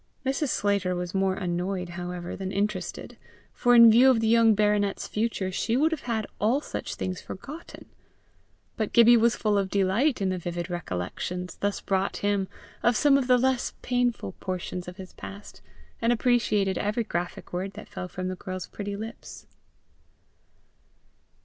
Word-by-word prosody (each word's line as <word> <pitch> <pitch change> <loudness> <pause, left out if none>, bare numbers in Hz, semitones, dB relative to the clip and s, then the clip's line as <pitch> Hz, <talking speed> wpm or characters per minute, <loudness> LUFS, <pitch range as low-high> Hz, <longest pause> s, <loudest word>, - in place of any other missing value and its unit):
Mrs. 275 +3 0
Slater 200 -4 +1
was 180 0 -4
more 190 -1 +1
annoyed, 180 0 -2
however, 175 0 -5
than 190 -1 -4
interested, 200 -1 -3 0.4
for, 245 0 +3
in 235 -1 +10
view 245 +4 +7
of 250 -3 +4
the 225 - +1
young 225 -1 +5
baronet's 205 -1 +1
future, 210 -4 -1
she 225 +5 0
would 315 +4 +3
have 320 - -2
had 220 -2 0
all 230 +7 +2
such - - -5
things 185 -1 -4
forgotten; 300 - -9 0.9
but 215 -2 -2
Gibbie 235 0 +8
was 235 0 +4
full 210 -2 +1
of 195 -1 -1
delight 205 +9 +2
in 195 -2 0
the 185 -1 -2
vivid 175 +1 -4
recollections 175 - -4
thus 205 0 -1
brought 195 0 0
him 200 -2 +1 0.3
of 240 -2 +3
some 290 -2 +5
of 275 -2 +2
the 250 -1 +6
less 260 0 0
painful 245 - 0
portions 180 -1 -4
of 180 +1 -8
his 185 -2 -10
past, 200 +1 -10 0.4
and 230 +1 +3
appreciated 220 -5 +2
every 210 +3 0
graphic 175 -5 -4
word 190 +2 -3
that 215 +2 -10
fell 180 - -6
from 185 0 -5
the 185 - -3
girl's 185 -1 -6
pretty 205 -1 -6
lips. 220 +3 -8
200 Hz, 165 wpm, -27 LUFS, 185-235 Hz, 0.9 s, in